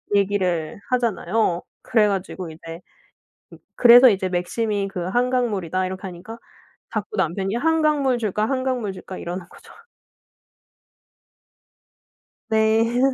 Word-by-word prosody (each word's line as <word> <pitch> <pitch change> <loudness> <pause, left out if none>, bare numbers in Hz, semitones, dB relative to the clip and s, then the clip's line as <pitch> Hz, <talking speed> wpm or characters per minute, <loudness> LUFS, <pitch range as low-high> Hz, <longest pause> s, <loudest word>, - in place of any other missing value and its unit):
얘기를 190 -5 0
하잖아요. 225 -6 0 0.2
그래 220 -3 +3
가지고 190 -3 -4
이제 165 +1 -9
으 180 - -27 0.8
그래서 245 +1 +8
이제 190 -3 0
"맥심이 200 +3 -1
그 190 - -6
한강물이다." 210 -6 0
이렇게 185 0 -6
하니까 190 +4 -8 0.6
자꾸 210 -1 -4
남편이 190 +3 -1
"한강물 300 -2 +2
줄까? 215 -1 -1
한강물 255 -6 -2
줄까?" 185 0 -9
이러는 175 +1 -6
거죠. - - -16 2.8
네. 220 +2 +2
205 Hz, 255 characters per minute, -22 LUFS, 185-235 Hz, 2.8 s, 그래서